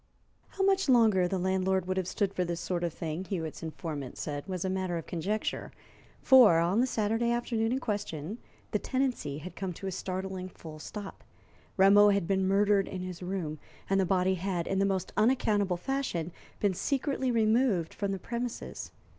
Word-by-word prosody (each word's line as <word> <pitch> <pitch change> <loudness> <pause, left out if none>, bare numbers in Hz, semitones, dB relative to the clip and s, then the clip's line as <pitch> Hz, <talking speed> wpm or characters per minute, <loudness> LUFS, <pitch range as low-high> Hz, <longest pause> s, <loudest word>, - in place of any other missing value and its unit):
How 385 - +1
much 390 -4 +3
longer 220 -7 +5
the 190 - -1
landlord 190 0 +1
would 185 0 -1
have 185 -2 -1
stood 195 0 0
this 175 -2 -1
sort 175 0 -2
of 170 - 0
thing, 160 +2 -4
Hewitt's 165 -6 -4
informant 155 -4 -5
said, 145 +2 -4
was 185 -1 -3
a - - +1
matter 185 -2 -1
of 165 - -6
conjecture, 195 +6 -2 0.5
for 245 -10 +8
on 175 +6 +2
the 255 - +2
Saturday 225 0 0
afternoon 235 -1 0
in 255 - +1
question 205 - -4 0.3
the 210 - +1
tenancy 255 - -1
had 170 +4 -8
come 190 -2 -4
to 195 - -9
a 190 - -2
startling 185 0 -4
full 155 -3 -11
stop. 205 +5 -8 0.5
Rameau 200 +2 +7
had 200 -3 +2
been 190 -1 +1
murdered 200 0 +3
in 185 - -5
his 185 -1 -6
room, 180 -5 -3 0.3
and 195 0 +2
the 190 - +3
body 185 0 +2
had, 180 -2 -2
in 195 - 0
the 195 - +3
most 190 -2 -2
unaccountable 210 -5 +2
fashion, 180 - -2 0.3
been 200 -2 +2
secretly 270 - -1
removed 220 -6 +2
from 200 -1 -2
the 195 - -2
premises. 235 +4 -5
190 Hz, 180 wpm, -30 LUFS, 175-215 Hz, 0.5 s, for